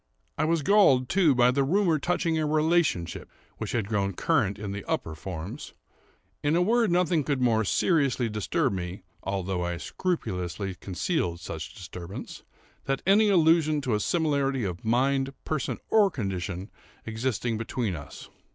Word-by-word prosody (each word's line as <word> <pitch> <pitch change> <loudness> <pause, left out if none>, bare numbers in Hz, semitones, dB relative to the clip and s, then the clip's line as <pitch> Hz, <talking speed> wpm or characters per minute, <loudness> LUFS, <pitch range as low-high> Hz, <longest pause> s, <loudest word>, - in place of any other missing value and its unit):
I - - 0
was 165 -1 +1
galled, 135 -10 +5
too, 170 -7 +4
by 125 0 +5
the 140 +2 +1
rumor 170 +1 +2
touching 170 +1 0
a 155 - 0
relationship, 155 - +1 0.3
which - - -4
had 110 -5 0
grown 100 -2 0
current 95 +3 +1
in 105 -2 -5
the 100 0 -5
upper 80 - -2
forms. 90 - -7 0.7
In 150 +2 +1
a 175 - +3
word, 230 +2 +3
nothing 175 -3 +2
could 140 -1 -1
more 115 -3 +3
seriously 135 - +2
disturb 105 -2 0
me, 90 0 -5 0.2
(although 95 -2 -2
I 85 0 -2
scrupulously 95 - -3
concealed 90 - -2
such 80 -2 -7
disturbance,) 95 -2 -8 0.4
than 135 0 0
any 205 +3 +5
allusion 160 -4 +4
to 125 -4 -1
a 105 - +2
similarity 140 - 0
of 90 -3 -4
mind, 135 +4 +1
person, 155 -4 -2
or 210 -3 +5
condition 95 - -4 0.3
existing 115 0 -2
between 115 -4 -2
us. 75 -3 -10
125 Hz, 150 wpm, -27 LUFS, 95-160 Hz, 0.7 s, galled